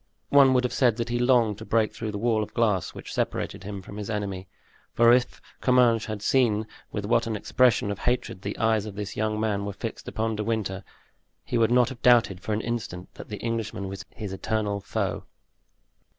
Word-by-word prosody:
One 135 -2 +6
would 125 - +3
have 125 - -1
said 120 -4 +3
that 120 0 -2
he 120 0 0
longed 120 -4 +3
to - - -7
break 110 -2 +1
through 110 -1 -4
the 105 - -4
wall 110 0 +1
of 105 0 -6
glass 105 -6 +1
which - - -8
separated - - -2
him 100 -1 -6
from 100 - -10
his 105 0 -5
enemy; 100 -3 -3 0.5
for 120 0 +6
if 125 -1 +1 0.2
Comminges 125 -3 +4
had 105 -1 -5
seen 110 -5 +2 0.3
with 105 -1 -3
what 115 +2 +2
an 110 - -2
expression 110 -1 +2
of 100 - -5
hatred 120 -6 -1
the 100 +1 -4
eyes 110 -2 +1
of 100 - -8
this 105 0 -5
young 110 0 -1
man 105 -2 0
were 100 0 -4
fixed 110 +3 -6
upon 110 0 -1
De 105 - -1
Winter, 105 -4 -2 0.6
he 120 - -1
would 115 -1 +4
not 125 0 +4
have 130 -3 -9
doubted 115 -7 +4
for - - -4
an 105 +1 0
instant 110 -7 -5
that - - -11
the 105 - -5
Englishman 115 -3 -3
was 95 0 -6
his 105 -3 -7
eternal 105 0 -1
foe. - - -3
110 Hz, 210 wpm, -26 LUFS, 100-120 Hz, 0.6 s, One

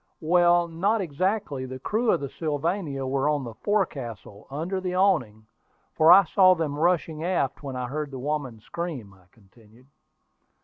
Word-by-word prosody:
"Well, 175 +1 +4
not 195 +7 0
exactly. 180 -4 -2
The 130 0 -7
crew 220 - -1
of - - +2
the 140 - -4
Sylvania 155 -1 -3
were 135 +2 0
on 145 -2 0
the 115 -2 -7
forecastle, 120 - -3
under 170 +7 -3
the 180 -1 -3
awning, 125 - +1 0.5
for 160 +1 +5
I 195 +3 +9
saw 185 +1 +5
them 155 -4 -2
rushing 165 -2 0
aft 175 -7 -1
when 135 -3 -6
I 125 0 -3
heard 145 +3 -4
the 135 - -8
woman 135 -4 -3
scream," 140 - -6
I 95 -2 -23
continued. 110 +3 -22
150 Hz, 165 wpm, -25 LUFS, 130-180 Hz, 0.5 s, I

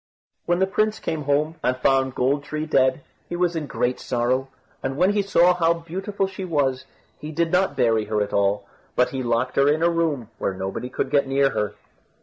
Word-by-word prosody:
When 175 0 +2
the 190 - +3
prince 215 +2 0
came 150 -3 -3
home, 150 +3 +1
and 130 0 +1
found 130 0 +2
Gold 140 +3 +1
tree 155 +1 -4
dead, 130 -2 +2 0.3
he 175 - -3
was 175 -1 +1
in 155 -3 -3
great 125 -2 -1
sorrow, 125 +2 0 0.3
and 135 +1 -3
when 185 +5 +4
he 205 - +2
saw 180 -2 +4
how 170 -1 +2
beautiful 190 +4 -3
she 190 0 -6
was, 140 -7 0 0.3
he 150 - -7
did 165 +1 0
not 180 -4 +2
bury 115 -4 +2
her 105 0 -1
at 100 - -7
all, 100 0 +1 0.3
but 125 - +3
he 135 - -4
locked 120 +1 -1
her 140 0 +5
in 155 +2 +2
a 170 - +4
room 150 -9 -1
where 95 - -1
nobody 95 +6 -4
would 130 - -1
get 140 -2 +3
near 135 0 +2
her. 105 0 -2
140 Hz, 210 wpm, -23 LUFS, 125-170 Hz, 0.3 s, her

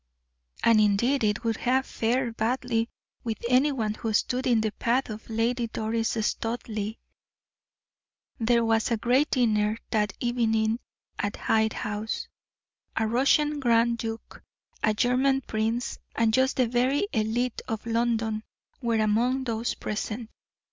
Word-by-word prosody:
And 230 -2 +6
indeed 230 +6 +2
it 210 +2 +1
would 225 -1 0
have 260 +2 +1
fared 235 +1 -1
badly 230 0 0 0.3
with 225 -2 -2
any 255 +4 +4
one 220 -6 -1
who 220 0 -3
stood 250 +4 +1
in 235 -3 +4
the 215 -1 0
path 235 +3 0
of 215 +2 -9
Lady 230 +2 0
Doris 225 +1 -1
Studleigh. 220 -2 -3 1.4
There 235 0 +3
was 225 -1 +2
a 230 - +1
great 250 +7 +2
dinner 215 -4 +2
that 210 -2 +1
evening 225 -2 +1 0.4
at 205 - -1
Hyde 220 0 +1
House. 210 +1 -3 0.7
A 225 - +2
Russian 285 +6 +2
grand 235 -2 +3
duke, 225 0 -6 0.4
a 215 -1 +2
German 260 +3 +2
prince, 225 +1 -2 0.2
and 225 -1 +2
just 260 +2 +2
the 255 -2 +3
very 255 - +1
elite 225 +2 0
of 225 -1 -4
London 225 -2 0 0.4
were 235 -2 +1
among 235 +5 +2
those 230 -1 -2
present. 220 +2 -4
230 Hz, 135 wpm, -27 LUFS, 220-245 Hz, 1.4 s, And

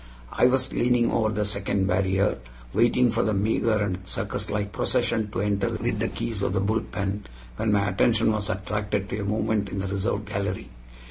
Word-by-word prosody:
I - - +4
was 130 0 +1
leaning 120 -1 +2
over 110 -1 +2
the 105 -1 -1
second 100 -1 0
barrier, 95 -4 +1 0.3
waiting 120 +1 +4
for 115 +1 +1
the 110 - +1
meager 110 +3 +2
and 100 -3 -1
circuslike 100 +2 -3
procession 115 -1 0
to 100 - -2
enter 100 -1 +1
with - - -2
the - - +1
keys 110 -4 -3
of 95 - 0
the 95 - +1
bull 110 +3 +1
pen, 100 +1 -4 0.3
when 110 0 +1
my 100 -1 +2
attention 110 +3 +3
was 105 -1 -2
attracted 105 0 -2
to 105 - -3
a - - -2
movement 105 0 0
in 100 - -5
the 95 - -2
reserved 100 +2 -1
gallery. 100 0 -3
105 Hz, 190 wpm, -26 LUFS, 100-110 Hz, 0.3 s, I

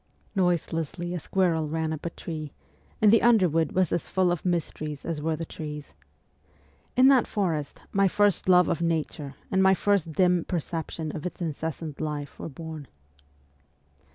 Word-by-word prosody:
Noiselessly 175 -1 -1
a 175 - -2
squirrel 165 -3 +1
ran 160 0 -1
up 155 +2 -5
a - - -1
tree, 155 -3 -7 0.5
and 210 0 +7
the 230 - +6
underwood 180 -9 +3
was 185 -3 +2
as 170 - -1
full 185 -2 +2
of 175 - -2
mysteries 155 -4 -2
as 160 -3 -3
were 160 +1 0
the 165 +1 -5
trees. 150 -2 -7 1.0
In 255 +1 +7
that 265 -3 +5
forest 165 -8 -2
my 195 0 +3
first 205 -1 +2
love 180 -1 +6
of 170 - -1
Nature 155 -4 -2 0.2
and 190 - +3
my 190 0 +6
first 190 -5 +1
dim 180 0 +3
perception 165 -2 -4
of 155 +3 -3
its - - -9
incessant 160 -2 -4
life 145 -5 -4
were - - -5
born. 160 -1 -8
165 Hz, 160 wpm, -27 LUFS, 155-185 Hz, 1.0 s, and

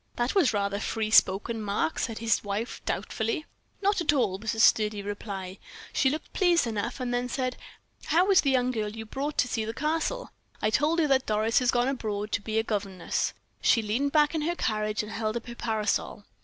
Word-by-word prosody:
"That 240 +1 0
was 370 -9 +4
rather 200 -1 -1
free 220 0 -2
spoken, 220 +3 +4
Mark," 210 +9 -1
said 225 -3 -2
his 225 -1 +1
wife, 205 +3 -3
doubtfully. 350 -9 -2 0.4
"Not 400 -1 +2
at 335 - +3
all," 225 -10 +1
was 225 +1 -2
the 225 - -5
sturdy 210 -2 +4
reply. 200 -2 -6 0.3
"She 265 - +3
looked 305 +4 -5
pleased 350 -5 +3
enough; 230 +1 -3
then 245 -1 -1
she 250 - -7
said: 255 -2 -1 0.5
'How 355 +6 +3
is 380 - +6
the 280 - +1
young 255 -1 +2
girl 215 -3 -2
you 220 +1 -7
brought 280 +6 -4
to 250 - +3
see 225 -3 -1
the 225 +1 -5
Castle?' 325 - -1 0.3
I 215 - +1
told 300 +7 +2
her 330 - +3
that 270 -1 +2
Doris 215 +1 +2
had 250 -1 +1
gone 245 0 +2
abroad, 210 -6 -3
to - - 0
be 220 +1 -3
a 220 - +3
governess; 195 -5 -2 0.3
she 230 - +4
leaned 245 +7 0
back 300 0 +4
in 320 - -1
her 340 +3 -1
carriage, 215 -5 -1
and 210 - -8
held 220 0 -2
up 235 - -7
her 240 - -7
parasol. 220 -2 -2
230 Hz, 210 wpm, -27 LUFS, 215-275 Hz, 0.5 s, is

